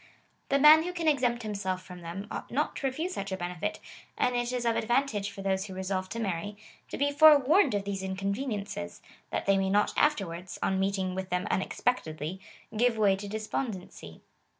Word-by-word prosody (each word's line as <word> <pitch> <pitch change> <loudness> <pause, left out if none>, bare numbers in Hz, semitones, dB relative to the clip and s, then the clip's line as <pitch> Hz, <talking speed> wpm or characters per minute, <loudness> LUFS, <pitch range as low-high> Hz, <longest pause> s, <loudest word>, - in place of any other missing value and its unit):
259 275 0 +2
man 310 +1 +9
who 360 - -3
can 335 -2 -2
exempt 245 -5 +2
himself 195 -3 -3
from 180 -1 -11
them, 170 +4 -6
ought - - -5
not 295 +5 -1
to 275 - -1
refuse 320 +8 -3
such 200 - -4
a 190 - -2
benefit, 175 -2 -3 0.4
and 250 - +1
it 240 0 0
is 250 -1 -2
of 230 -1 +2
advantage 225 -4 0
for 195 -1 -9
those 190 0 0
who 190 - -8
resolve 185 0 -2
to - - -5
marry, 205 -1 -3 0.3
to - - -5
be 285 +1 +1
forewarned 300 - +6
of 200 -1 -2
those 200 -1 -3
inconveniences, 200 - -4 0.3
that - - -2
they 195 0 +3
may 190 0 0
not 205 +2 +2
afterwards, 185 - 0
on 190 0 +1
meeting 190 -1 0
with 190 0 -4
them 180 0 -1
unexpect 245 +6 0
edly, 155 +3 -5 0.4
give 235 +1 +2
way 205 -3 +4
to 200 +1 -7
despondency. 210 - -5
200 Hz, 195 wpm, -29 LUFS, 190-245 Hz, 0.4 s, man